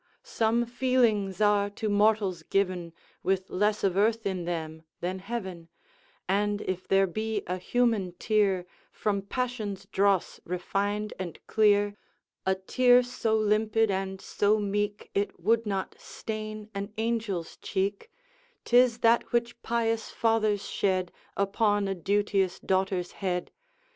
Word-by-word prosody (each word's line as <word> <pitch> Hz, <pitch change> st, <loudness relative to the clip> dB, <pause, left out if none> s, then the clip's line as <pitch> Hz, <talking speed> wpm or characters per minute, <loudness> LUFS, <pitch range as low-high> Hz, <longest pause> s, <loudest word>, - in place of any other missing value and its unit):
Some 230 Hz, +1 st, +1 dB
feelings 235 Hz, -6 st, +1 dB
are 205 Hz, -1 st, +3 dB
to 210 Hz, +2 st, -4 dB
mortals 205 Hz, -4 st, +2 dB
given 180 Hz, -1 st, -1 dB, 0.3 s
With 190 Hz, +1 st, -1 dB
less 210 Hz, +2 st, +1 dB
of 190 Hz, -2 st, +2 dB
earth 220 Hz, +2 st, +2 dB
in 185 Hz, -3 st, -2 dB
them 160 Hz, -2 st, -4 dB, 0.2 s
than 185 Hz, +2 st, -3 dB
heaven; 190 Hz, -5 st, -6 dB, 0.6 s
And 205 Hz, +1 st, +1 dB
if 185 Hz, 0 st, -4 dB
there 195 Hz, 0 st, +4 dB
be 215 Hz, +3 st, -2 dB
a 180 Hz, +1 st, -2 dB
human 220 Hz, -2 st, +1 dB
tear 195 Hz, -1 st, +1 dB, 0.3 s
From 200 Hz, -2 st, -1 dB
passion's 215 Hz, -3 st, -3 dB
dross 195 Hz, -2 st, +1 dB
refined 200 Hz, +4 st, -2 dB
and 175 Hz, -4 st, -5 dB
clear, 205 Hz, -1 st, +3 dB, 0.5 s
A 190 Hz, -, +3 dB
tear 245 Hz, +6 st, +4 dB
so 230 Hz, -2 st, -1 dB
limpid 215 Hz, 0 st, +2 dB
and 190 Hz, 0 st, -2 dB
so 205 Hz, +2 st, +1 dB
meek 205 Hz, 0 st, -2 dB
It 200 Hz, -1 st, -1 dB
would 225 Hz, +5 st, +2 dB
not 195 Hz, -2 st, -2 dB
stain 215 Hz, -1 st, -6 dB
an 200 Hz, +1 st, -4 dB
angel's 220 Hz, -7 st, -2 dB
cheek, 200 Hz, -, -2 dB, 0.5 s
'Tis 245 Hz, -1 st, +5 dB
that 230 Hz, +1 st, +3 dB
which 235 Hz, 0 st, -1 dB
pious 230 Hz, -1 st, 0 dB
fathers 215 Hz, -3 st, +1 dB
shed 185 Hz, -2 st, 0 dB, 0.3 s
Upon 205 Hz, +1 st, +2 dB
a 195 Hz, -, 0 dB
duteous 195 Hz, 0 st, 0 dB
daughter's 190 Hz, -1 st, 0 dB
head! 180 Hz, -3 st, -3 dB
205 Hz, 130 wpm, -28 LUFS, 190-220 Hz, 0.6 s, Tis